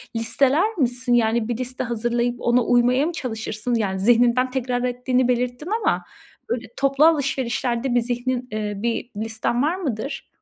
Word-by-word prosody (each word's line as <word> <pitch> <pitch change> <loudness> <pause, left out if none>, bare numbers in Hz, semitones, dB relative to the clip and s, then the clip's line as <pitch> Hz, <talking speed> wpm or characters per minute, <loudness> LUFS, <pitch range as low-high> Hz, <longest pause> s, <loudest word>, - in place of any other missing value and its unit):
listeler 275 - +2
misin? 250 -2 +1
Yani, 230 -1 +2
bir 235 -2 -2
liste 255 0 -4
hazırlayıp 240 +1 -1
ona 240 0 +3
uymaya 245 +4 +3
mı 345 - -1
çalışırsın? 225 -3 -3
Yani, 190 -4 -1
zihninden 240 +4 +3
tekrar 250 -1 -1
ettiğini 250 0 0
belirttin 250 +6 -1
ama - - +1 0.5
böyle 235 -1 -2
toplu 275 +2 +3
alışverişlerde 260 -4 +1
bir 240 - +4
zihnin, 245 +1 -2
iii, 210 -1 -4
bir 235 +1 -2
listen 225 +2 -1
var 320 +5 +1
mıdır? 275 - -4
245 Hz, 150 wpm, -22 LUFS, 235-255 Hz, 0.5 s, bir